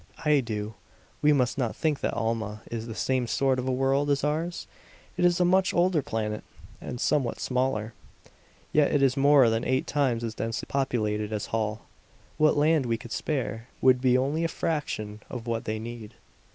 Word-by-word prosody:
"I 150 -1 +5
do. 110 -3 -4 0.5
We 150 - +5
must 135 -2 +1
not 120 -4 -1
think 155 -3 0
that - - -2
Alma 110 -2 -2
is 115 0 -4
the 115 - -6
same 130 -1 0
sort 130 +1 +1
of 125 - -3
a - - +1
world 135 +2 +1
as 140 -1 +1
ours. 160 +4 -2 0.5
It 180 - -1
is 175 0 +4
a 180 - +4
much 185 +1 +3
older 175 -2 +3
planet, 105 -4 -3 0.4
and 120 - -6
somewhat 135 -3 0
smaller. 125 -4 -1 0.8
Yet 150 -1 +4
it 145 -2 +2
is 135 -1 +3
more 140 -2 +6
than 115 +1 0
eight 130 +1 0
times 130 -5 0
as 115 -1 -3
densely 115 0 -3
populated 110 -6 -1
as 105 -2 -2
Holl. 110 -1 -1 0.6
What 155 -1 +4
land 150 -2 +3
we 115 -1 0
could 115 +1 -11
spare 115 -6 -3
would 130 -1 +4
be 125 -1 +4
only 140 +6 0
a - - +2
fraction 130 -11 -3
of 120 -2 -6
what 115 -1 -2
they 110 0 -2
need. 115 -1 -8
130 Hz, 190 wpm, -27 LUFS, 115-145 Hz, 0.8 s, more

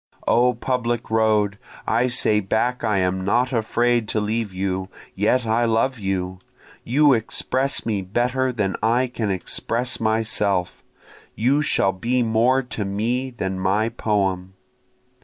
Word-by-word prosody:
O 125 +1 +3
public 120 -3 -2
road, 105 -2 +2 0.3
I 120 +3 +2
say 110 -3 +2
back 110 +5 -1
I 105 -3 +1
am 95 0 0
not 125 +6 +1
afraid 120 0 +1
to 110 - 0
leave 110 0 -2
you, 95 0 -3 0.2
yet 115 +5 +1
I 115 +2 +2
love 115 +3 +1
you, 95 -2 -3 0.4
You 145 +4 +4
express 130 +4 -1
me 105 -4 -1
better 125 +7 0
than 105 -5 -1
I 115 +4 +2
can 120 -4 -3
express 115 +6 -2
myself, 105 -4 0 0.5
You 130 +7 +2
shall 100 -9 +2
be 120 +7 0
more 120 +4 +2
to 120 -3 -5
me 115 +7 -1
than 95 -6 -4
my 100 +4 +1
poem. 95 -5 -1
110 Hz, 140 wpm, -22 LUFS, 100-125 Hz, 0.5 s, You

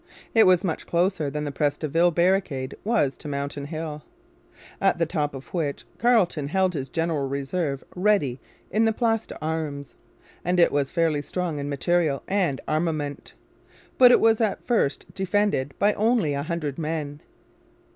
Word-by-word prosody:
It 225 -3 +6
was 185 0 +4
much 170 -5 -3
closer 170 -3 +1
than 150 +2 -3
the 145 - -3
Pres 145 0 0
de 155 - -3
Ville 165 +4 +3
barricade 170 -6 +1
was 210 - +1
to - - -8
Mountain 140 0 -4
Hill, 155 0 -5 0.8
at 195 -3 +3
the 165 - +2
top 150 -4 -2
of 135 - -11
which 155 -6 -2
Carleton 200 - +2
held 185 +3 +1
his 135 -4 -4
general 165 -4 -1
reserve 140 +1 -2
ready 180 -10 +1 0.3
in 220 +3 +3
the 225 - +2
Place 225 -1 0
d'Armes; 155 -3 -4 0.5
and 180 +1 +1
it 170 - +5
was 140 -1 0
fairly 165 -4 +1
strong 165 0 -3
in 140 0 -4
material 150 0 0
and 185 -9 0
armament. 155 -2 -2 0.6
But 250 -1 +9
it - - +6
was 225 0 +3
at 215 -3 -1
first 225 - +1
defended 190 -8 0
by 205 +1 +3
only 215 -8 +2
a 140 - -2
hundred 155 -2 -3
men. 150 -2 -3
160 Hz, 165 wpm, -25 LUFS, 145-190 Hz, 0.8 s, But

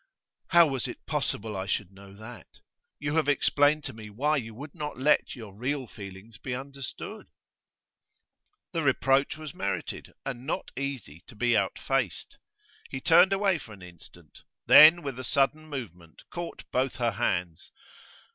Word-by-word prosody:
'How 170 -1 +7
was 135 -5 -2
it - - -9
possible 105 0 -2
I 95 0 -4
should 100 -2 -1
know 100 0 -14
that? 110 +3 -11 0.5
You 145 0 -3
have 155 - +2
explained 145 +1 +3
to - - -5
me 110 -1 -10
why 145 +9 +1
you 115 -4 -5
would 145 +4 -9
not 150 -5 -5
let 145 +3 +2
your 110 -6 -10
real 130 +4 -2
feelings 100 0 -11
be 130 - -4
understood.' 135 0 -7 1.4
The 165 - -1
reproach 135 0 +2
was 155 -3 -8
merited, 100 0 -4
and 130 -1 -5
not - - -3
easy 130 - -5
to 120 - -13
be 120 +2 +2
outfaced. 130 -8 -1 0.5
He 135 - -4
turned 175 +6 +6
away 195 -3 +2
for 110 - -11
an 95 -3 -13
instant, 90 -2 -15 0.2
then 160 +3 +9
with 135 -3 -5
a - - -5
sudden 150 +5 +1
movement 90 - -8
caught 175 -1 -6
both 130 +1 0
her 120 -2 +1
hands. 90 -5 -2
130 Hz, 155 wpm, -28 LUFS, 105-145 Hz, 1.4 s, then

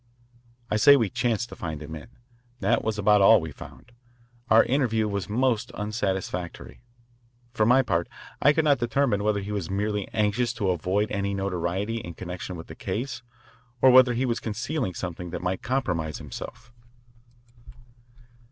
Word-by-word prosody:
I 105 - +2
say 140 +5 +7
we 110 -7 0
chanced 120 0 -1
to - - -9
find 80 -3 -5
him 75 +1 -8
in. 75 - -8 0.5
That 105 +4 +1
was 110 -1 -1
about 105 0 +4
all 110 +3 +7
we 80 -2 -6
found. 120 - -13 0.6
Our 110 +1 +7
interview 115 -5 +1
was 100 -1 -3
most 120 +1 +1
unsatisfactory. 95 -4 -4 0.7
For 110 -2 +2
my 130 +2 +5
part, 85 -8 -1 0.3
I 145 - +6
could 160 +1 +1
not 140 -4 +4
determine 120 -3 +1
whether 105 -1 +1
he 100 +2 -6
was 100 -5 -3
merely 105 +1 -1
anxious 115 +3 0
to 100 -5 0
avoid 95 +5 -1
any 100 -1 -1
notoriety 95 +3 -2
in 85 -7 -7
connection 90 0 -6
with 80 - -8
the - - -10
case 130 +5 -4 0.6
or 130 - +6
whether 125 -1 +6
he 130 +3 0
was 120 -2 -1
concealing 115 - -3
something 90 -1 -5
that 90 - -6
might 90 +1 -2
compromise 85 - -2
himself. 120 +1 -9
105 Hz, 160 wpm, -26 LUFS, 95-120 Hz, 0.7 s, say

